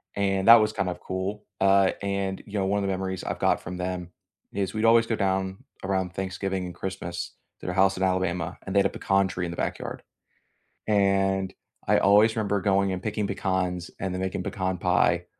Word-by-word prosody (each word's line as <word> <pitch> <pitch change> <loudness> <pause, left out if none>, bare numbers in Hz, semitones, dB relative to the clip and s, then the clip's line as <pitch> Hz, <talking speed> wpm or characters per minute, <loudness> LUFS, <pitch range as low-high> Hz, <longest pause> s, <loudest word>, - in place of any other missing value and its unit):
and 95 -1 0
that 115 - +12
was 110 0 +1
kind 100 -3 -1
of 90 - -6
cool. 95 +3 -4 0.2
Uh, 95 0 +5
and, 100 -1 -2
you 105 0 -4
know, 95 - +1
one 100 +2 +1
of 100 - -2
the - - -1
memories 95 0 -3
I've - - -3
got - - +2
from 90 - -6
them 90 -1 -4 0.4
is 100 -1 -2
we'd 110 +1 0
always 115 0 +6
go 115 - 0
down 95 -1 0 0.3
around 95 -2 -1
Thanksgiving 95 0 -3
and 90 - -6
Christmas 90 -2 -5 0.3
to - - -12
their 90 - -2
house 95 0 +3
in 95 - -1
Alabama, 90 -2 0
and 95 - -4
they - - +6
had 100 - +3
a - - -7
pecan 95 0 +1
tree 90 -1 -3
in 85 - -4
the 85 - -7
backyard. - - -3 0.9
And 95 -2 +2 0.3
I - - +5
always 105 +3 +5
remember 100 -2 0
going 100 -1 +2
and 95 0 -4
picking 105 -1 -1
pecans 95 -3 -1
and 95 -2 -2
then 90 - -3
making 95 -1 -2
pecan 95 -1 -2
pie - - +2
95 Hz, 210 wpm, -26 LUFS, 95-100 Hz, 0.9 s, that